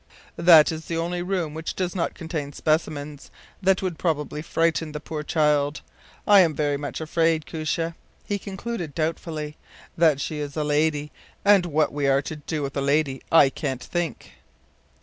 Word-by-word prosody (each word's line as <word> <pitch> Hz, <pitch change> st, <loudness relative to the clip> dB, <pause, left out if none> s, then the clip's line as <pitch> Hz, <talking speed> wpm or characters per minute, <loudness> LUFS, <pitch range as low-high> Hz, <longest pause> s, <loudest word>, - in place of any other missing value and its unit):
“That 170 Hz, -3 st, +7 dB
is 160 Hz, 0 st, -6 dB
the 165 Hz, -, -3 dB
only 175 Hz, +2 st, -2 dB
room 175 Hz, -4 st, -2 dB
which 160 Hz, +1 st, -5 dB
does 180 Hz, -2 st, -2 dB
not 175 Hz, -3 st, -2 dB
contain 160 Hz, -4 st, -5 dB
specimens 150 Hz, -2 st, -2 dB, 0.3 s
that 190 Hz, 0 st, +2 dB
would 180 Hz, -4 st, -3 dB
probably 150 Hz, -3 st, -1 dB
frighten 165 Hz, -1 st, 0 dB
the 150 Hz, -, -4 dB
poor 150 Hz, 0 st, -5 dB
child. 150 Hz, -1 st, +1 dB, 0.4 s
I 205 Hz, -1 st, +7 dB
am 165 Hz, -5 st, +4 dB
very 145 Hz, -1 st, 0 dB
much 145 Hz, 0 st, -5 dB
afraid, 160 Hz, 0 st, +1 dB
Koosje,” 165 Hz, +1 st, -2 dB, 0.3 s
he 205 Hz, -1 st, -2 dB
concluded, 195 Hz, -5 st, -5 dB
doubtfully, 155 Hz, -2 st, -3 dB, 0.4 s
“that 160 Hz, -4 st, +4 dB
she 150 Hz, +1 st, -3 dB
is 145 Hz, 0 st, -5 dB
a 155 Hz, -, +1 dB
lady; 150 Hz, 0 st, +1 dB, 0.3 s
and 200 Hz, -3 st, +5 dB
what 155 Hz, -2 st, +1 dB
we 145 Hz, -1 st, 0 dB
are 135 Hz, +1 st, +3 dB
to 155 Hz, -, -5 dB
do 150 Hz, 0 st, -4 dB
with 140 Hz, 0 st, -4 dB
a 140 Hz, -, 0 dB
lady 140 Hz, -1 st, +1 dB
I 145 Hz, -4 st, +6 dB
can’t 135 Hz, -4 st, -4 dB
think. 175 Hz, -3 st, -4 dB
155 Hz, 170 wpm, -24 LUFS, 150-170 Hz, 0.4 s, That